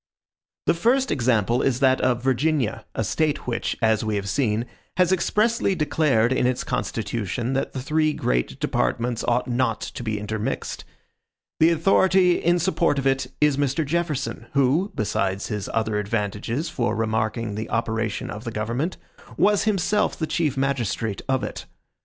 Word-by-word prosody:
The -, -, +4 dB
first 245 Hz, +10 st, +2 dB
example 120 Hz, -3 st, +2 dB
is 130 Hz, -2 st, +1 dB
that 130 Hz, -1 st, +3 dB
of 125 Hz, -1 st, +1 dB
Virginia, 135 Hz, -2 st, 0 dB
a -, -, 0 dB
State 150 Hz, +7 st, 0 dB
which, 120 Hz, -2 st, -2 dB
as 110 Hz, -1 st, +3 dB
we 110 Hz, -1 st, -1 dB
have 100 Hz, -1 st, -2 dB
seen, 115 Hz, 0 st, 0 dB, 0.3 s
has 180 Hz, -1 st, +4 dB
expressly 210 Hz, +3 st, +2 dB
declared 145 Hz, -6 st, +2 dB
in 125 Hz, -, +2 dB
its 125 Hz, 0 st, -1 dB
constitution, 115 Hz, 0 st, -2 dB
that 135 Hz, -, -1 dB
the 130 Hz, -, -4 dB
three 155 Hz, +2 st, +2 dB
great -, -, -1 dB
departments 120 Hz, -1 st, 0 dB
ought 120 Hz, +1 st, +1 dB
not 120 Hz, -2 st, 0 dB
to -, -, -6 dB
be 110 Hz, -3 st, -2 dB
intermixed. 105 Hz, +1 st, -4 dB, 0.7 s
The 160 Hz, -, +6 dB
authority 180 Hz, +2 st, +4 dB
in 175 Hz, +1 st, +2 dB
support 170 Hz, -3 st, +1 dB
of 135 Hz, -, -2 dB
it 135 Hz, -1 st, +1 dB
is 150 Hz, -2 st, +3 dB
Mr. 145 Hz, +2 st, 0 dB
Jefferson, 155 Hz, -2 st, -2 dB
who, 140 Hz, +9 st, +2 dB
besides 100 Hz, -2 st, -1 dB
his 105 Hz, -2 st, -3 dB
other 110 Hz, -2 st, 0 dB
advantages 105 Hz, -, -2 dB
for 120 Hz, -9 st, -1 dB
remarking 110 Hz, 0 st, -1 dB
the 110 Hz, +2 st, -5 dB
operation 110 Hz, -1 st, -2 dB
of 105 Hz, +2 st, -7 dB
the 115 Hz, -, -4 dB
government, 115 Hz, +10 st, -2 dB, 0.4 s
was 205 Hz, 0 st, +3 dB
himself 210 Hz, 0 st, +1 dB
the 160 Hz, -, -1 dB
chief 155 Hz, -4 st, -1 dB
magistrate 120 Hz, -6 st, -1 dB
of 130 Hz, -1 st, +1 dB
it. -, -, -5 dB
130 Hz, 160 wpm, -24 LUFS, 110-155 Hz, 0.7 s, The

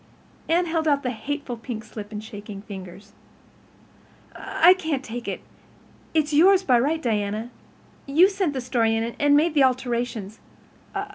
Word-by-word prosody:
Anne 345 Hz, +2 st, +3 dB
held 325 Hz, -1 st, -1 dB
out 285 Hz, -2 st, +2 dB
the 250 Hz, -, -1 dB
hateful 260 Hz, +3 st, -4 dB
pink 230 Hz, -1 st, -6 dB
slip 210 Hz, -1 st, -9 dB
in 210 Hz, -, -5 dB
shaking 205 Hz, -1 st, -9 dB
fingers. 195 Hz, -1 st, -10 dB, 1.2 s
"I 350 Hz, +3 st, +4 dB
can't 315 Hz, -7 st, -3 dB
take 240 Hz, 0 st, -7 dB
it—it's 310 Hz, -2 st, -5 dB
yours 375 Hz, +5 st, +6 dB
by 250 Hz, -8 st, +4 dB
right, 300 Hz, +6 st, +1 dB
Diana. 215 Hz, -2 st, -2 dB, 0.6 s
You 320 Hz, +7 st, +6 dB
sent 385 Hz, -6 st, -1 dB
the 260 Hz, -, -3 dB
story 230 Hz, -3 st, +1 dB
in 225 Hz, -, 0 dB, 0.2 s
and 290 Hz, 0 st, +5 dB
made 320 Hz, +2 st, +2 dB
the 290 Hz, -3 st, +4 dB
alterations. 240 Hz, -5 st, -1 dB
250 Hz, 145 wpm, -24 LUFS, 220-310 Hz, 1.2 s, yours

